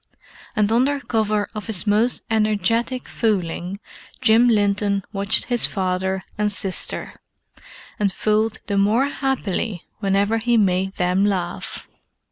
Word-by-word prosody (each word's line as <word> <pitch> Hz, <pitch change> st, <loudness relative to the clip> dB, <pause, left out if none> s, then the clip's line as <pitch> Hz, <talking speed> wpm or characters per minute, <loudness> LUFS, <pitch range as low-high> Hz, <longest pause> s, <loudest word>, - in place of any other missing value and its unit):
And 210 Hz, 0 st, +2 dB
under 265 Hz, +5 st, +2 dB
cover 215 Hz, -5 st, 0 dB
of 215 Hz, 0 st, -6 dB
his 220 Hz, -4 st, -1 dB
most 220 Hz, +4 st, +2 dB
energetic 220 Hz, +3 st, 0 dB
fooling 185 Hz, -3 st, -2 dB, 0.4 s
Jim 225 Hz, +2 st, +5 dB
Linton 205 Hz, -2 st, +1 dB
watched 200 Hz, -1 st, +3 dB
his 240 Hz, -2 st, +2 dB
father 190 Hz, 0 st, -2 dB, 0.2 s
and 210 Hz, 0 st, +1 dB
sister, 190 Hz, -1 st, -1 dB, 0.8 s
and 200 Hz, -2 st, +2 dB
fooled 215 Hz, +3 st, 0 dB
the 200 Hz, -2 st, 0 dB
more 215 Hz, +7 st, +3 dB
happily 225 Hz, -, -2 dB, 0.2 s
whenever 200 Hz, +2 st, +1 dB
he 240 Hz, +1 st, +2 dB
made 190 Hz, -2 st, +1 dB
them 180 Hz, +2 st, +1 dB
laugh. 185 Hz, -4 st, -2 dB
205 Hz, 120 wpm, -21 LUFS, 195-225 Hz, 0.8 s, Jim